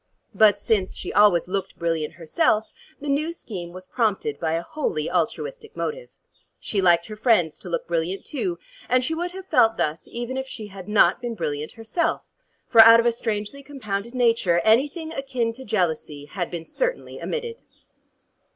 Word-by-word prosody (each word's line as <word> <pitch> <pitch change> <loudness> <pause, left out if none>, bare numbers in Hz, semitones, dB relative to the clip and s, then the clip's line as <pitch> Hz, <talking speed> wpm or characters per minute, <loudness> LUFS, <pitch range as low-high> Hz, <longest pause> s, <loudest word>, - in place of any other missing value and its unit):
But 210 -2 +5
since 205 -2 0
she - - -5
always 205 -5 +5
looked 195 0 -3
brilliant 165 -2 -1
herself, 215 - +1 0.3
the 290 - -7
new 295 +4 0
scheme 185 - -7
was 185 +1 -10
prompted 200 - -1
by 160 -1 -1
a 165 +1 -1
wholly 170 - -2
altruistic 445 - -2
motive. 485 +2 -4 0.5
She 200 - -1
liked 170 -2 +4
her 215 - -8
friends 210 -8 +2
to 180 - -8
look 170 - -2
brilliant 170 +3 -2
too, 345 +4 -3 0.3
and 255 0 +3
she 320 - -1
would 350 +2 -3
have 380 0 -8
felt 225 -11 +3
thus 155 +2 -2
even 240 +2 -5
if 265 0 -3
she 220 -4 -7
had 190 0 -10
not 210 +3 +4
been 240 -2 -4
brilliant 150 -5 -3
herself, 225 +9 -1 0.4
for 230 - +8
out 230 +1 +9
of 230 - +2
a 240 - +5
strangely 225 +3 -3
compounded 235 -5 -5
nature, 230 -8 +3
anything 290 - +2
akin 255 -5 -2
to 265 +3 -10
jealousy 160 - -1
had 175 +3 -4
been 170 -2 -6
certainly - - -3
omitted. 470 -1 -4
220 Hz, 175 wpm, -24 LUFS, 175-265 Hz, 0.5 s, out